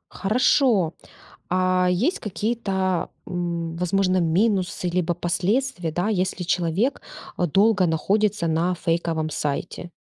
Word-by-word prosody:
Хорошо. 215 - +2 0.6
А 185 0 +2
есть 240 - +1
какие-то, 195 -4 -1 0.2
м, 170 -2 -3
возможно, 185 +1 +1
минусы, 180 +1 +1
либо 175 -1 0
последствия, 175 - -1
да, 175 +5 -1
если 185 -3 -1
человек 175 - 0 0.4
долго 190 +3 +3
находится 195 +4 +1
на 165 +3 +1
фейковом 165 -2 -1
сайте? 150 +4 -4
180 Hz, 100 wpm, -23 LUFS, 170-200 Hz, 0.6 s, долго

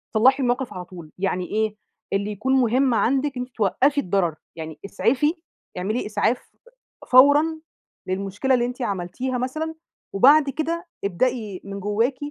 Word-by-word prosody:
صلحي 260 +5 +4
الموقف 245 +1 -1
على 180 -1 -6
طول، 170 -4 -12
يعني 185 -1 -1
إيه؟ 215 0 -1 0.4
اللي 200 +1 0
يكون 235 +6 -1
مهم 255 0 +3
عندِك 270 +3 +1
إن - - -2
أنتِ 250 -1 -14
توقفي 270 +8 +2
الضرر، 180 - 0 0.2
يعني 160 -2 -7
إسعفي 255 +9 +1 0.4
اعملي 210 +7 -2
إسعاف 225 +3 -1 0.6
فورًا 285 +4 +7 0.6
للمشكلة 195 +7 -1
اللي 240 -1 +3
أنتِ 250 +1 -5
عملتيها 220 +6 -2
مثلًا، 310 +6 -3 0.4
وبعد 280 +7 +6
كده 335 +4 -3 0.2
ابدئي 215 0 -1
من 200 0 -6
جواكِ، 220 +6 0
240 Hz, 140 wpm, -23 LUFS, 195-265 Hz, 0.6 s, فورًا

